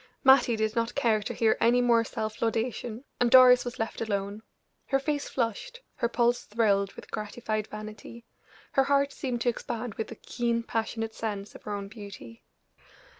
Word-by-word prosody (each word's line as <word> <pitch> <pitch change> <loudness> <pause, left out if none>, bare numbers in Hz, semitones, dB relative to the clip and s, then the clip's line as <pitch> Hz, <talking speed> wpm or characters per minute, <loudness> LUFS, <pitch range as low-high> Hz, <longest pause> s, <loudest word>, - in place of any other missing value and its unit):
Mattie 265 -3 +6
did 220 0 -1
not 230 0 -1
care 230 -6 +2
to - - -4
hear 225 -1 +2
any 240 +2 +5
more 235 -2 +4
self 220 -1 -5
laudation, 230 +1 -2 0.2
and 245 - +3
Doris 255 0 +8
was 245 - -6
left 225 +1 -3
alone. 200 -1 -2 0.5
Her 270 - +2
face 290 +1 -2
flushed, 260 - -3 0.2
her 235 - 0
pulse 240 0 +1
thrilled 200 -3 +1
with - - -12
gratified 215 0 -3
vanity; 215 +2 -9 0.5
her 270 - +3
heart 280 0 +2
seemed 245 -3 -3
to 245 - +2
expand 235 -1 -4
with 220 - -4
the 230 - -8
keen, 235 +1 -2
passionate 225 0 -3
sense 205 -3 -4
of - - -12
her 210 - -4
own 200 -1 -4
beauty. 200 - -11
230 Hz, 175 wpm, -28 LUFS, 215-245 Hz, 0.5 s, Doris